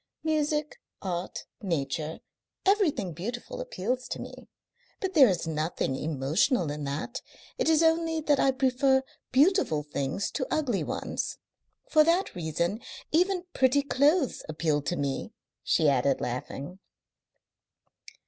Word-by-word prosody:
Music, 300 -1 0 0.2
art, 180 -1 -4 0.2
nature, 155 -4 -2 0.4
everything 365 - +2
beautiful 240 - -5
appeals 250 - -3
to - - -4
me. - - -9 0.5
But 380 -1 -2
there 285 -7 +8
is 180 -3 -1
nothing 155 -3 -1
emotional 155 - +1
in 145 0 -4
that. 145 - -4 0.4
It - - +2
is 320 0 +4
only 325 0 +2
that 295 -2 +2
I 275 - +4
prefer 265 0 +3 0.3
beautiful 275 - +3
things 145 +5 -2
to 260 - -2
ugly 260 -10 0
ones. - - -3 0.5
For 310 -1 +6
that 340 +4 +2
reason 170 +5 -2 0.3
even 360 +2 +2
pretty 265 +2 +3
clothes 285 +2 +2
appeal 155 -1 0
to 160 +5 -2
me," 140 -3 -3 0.3
she 155 - +3
added, 135 -1 +3
laughing. 140 +8 -5
240 Hz, 125 wpm, -28 LUFS, -, 0.5 s, there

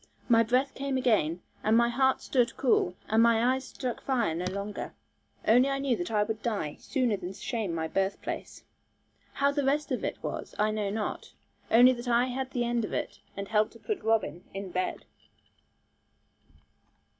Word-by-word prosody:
My 230 -2 +6
breath 250 +4 +1
came 275 -1 -2
again, 205 - +1 0.2
and 220 +1 +4
my 235 0 +4
heart 265 +2 +2
stood 245 -2 +1
cool, 210 -8 +2
and 220 +1 +3
my 235 +2 +4
eyes 265 0 -3
struck 250 -3 -4
fire 240 -10 0
no 175 +3 -3
longer. 200 +2 -5 0.5
Only 250 +5 +5
I 275 - 0
knew 275 -3 +1
that 175 -4 -4
I 210 -2 +2
would 220 +1 -4
die 200 -11 -2
sooner 250 -5 0
than 185 0 -6
shame 210 -4 -3
my 160 -1 -1
birthplace. 195 +3 -3 0.7
How 280 0 +2
the 285 0 -1
rest 285 +3 +1
of - - -1
it - - -2
was - - -5
I 215 +1 +2
know 210 -2 -1
not; 210 +1 -4 0.4
only 245 +3 +7
that 240 0 -7
I 240 +1 +4
had 260 +1 -3
the 245 -2 -1
end 235 -1 0
of - - -4
it, - - -3 0.2
and 200 0 -5
helped 215 -1 +2
to 230 - -15
put 420 - -3
Robin 200 -7 0
in 195 -1 -5
bed. 185 +1 -2
230 Hz, 180 wpm, -29 LUFS, 205-255 Hz, 0.7 s, only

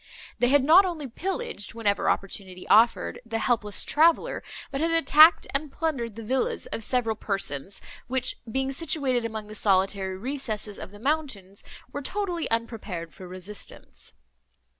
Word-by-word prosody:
They 245 - +4
had 280 +1 +4
not 330 +7 +8
only 340 -6 -3
pillaged, 345 - -3
whenever 205 -3 +1
opportunity 190 -2 -2
offered, 230 +4 +4
the 230 -1 -3
helpless 220 -3 +1
traveller, 325 +2 +3 0.3
but 275 0 -2
had 330 - +2
attacked, 330 0 +6
and 285 +1 -2
plundered 265 -10 -2
the 225 - -7
villas 255 +4 -1
of 225 - -3
several 230 -2 0
persons, 195 -5 -4 0.3
which, 255 0 0
being 265 +2 0
situated 270 -5 0
among 220 -2 -4
the 210 - -10
solitary 190 -2 +1
recesses 220 -3 -3
of - - -7
the 205 - -13
mountains, 225 -8 -2 0.3
were 285 - -4
totally 360 +1 -2
unprepared 215 - -3
for 185 - -10
resistance. 185 +3 -8
230 Hz, 145 wpm, -26 LUFS, 205-285 Hz, 0.3 s, not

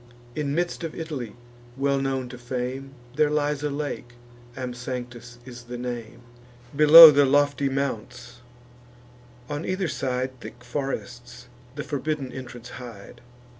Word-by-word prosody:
In 145 -2 -2
midst 175 +1 -2
of 165 - -5
Italy, 145 -10 -6 0.4
well 140 0 +1
known 135 -2 -2
to 125 - -9
fame, 130 +2 -5 0.2
There 150 0 +3
lies 150 -1 0
a 150 - -1
lake, 140 -4 -5 0.4
Amsanctus 125 -1 -6
is 120 -1 -11
the 120 0 -7
name, 120 -1 -6 0.5
Below 155 +2 +11
the 145 0 +4
lofty 145 0 +2
mounts: 125 -2 -4 1.1
on 145 +2 -4
either 185 0 -1
side 130 -2 -3
Thick 120 0 -11
forests 125 -1 -6 0.3
the - - -4
forbidden 145 -2 -3
entrance 125 -2 -9
hide. 115 -6 -11
130 Hz, 130 wpm, -25 LUFS, 120-145 Hz, 1.1 s, Below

